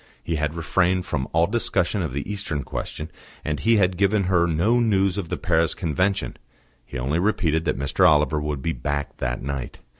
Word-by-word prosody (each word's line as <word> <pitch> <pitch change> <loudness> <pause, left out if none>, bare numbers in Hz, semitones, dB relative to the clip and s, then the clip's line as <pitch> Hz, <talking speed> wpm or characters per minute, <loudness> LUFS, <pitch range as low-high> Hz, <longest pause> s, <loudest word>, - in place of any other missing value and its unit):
He 80 - -2
had 75 +1 -1
refrained 90 +2 +1
from 65 -5 -2
all 80 +1 +3
discussion 100 -2 0
of 80 -6 -2
the 70 +2 -4
Eastern 95 -8 -3
question, 75 +6 -5 0.3
and 75 -2 -1
he 115 +10 +3
had 90 -3 +2
given 100 +1 +2
her 90 -2 +2
no 90 +9 +2
news 100 -5 +2
of 95 -5 -4
the - - -2
Paris 85 -1 +1
Convention; 95 +3 -1 0.5
he - - -7
only 70 +6 0
repeated 80 -5 +1
that - - 0
Mr. 75 +7 +3
Oliver 75 0 +2
would 75 -3 -3
be 80 - 0
back 70 -1 -3
that 60 0 -3
night. 70 -2 -4
80 Hz, 190 wpm, -24 LUFS, 75-95 Hz, 0.5 s, all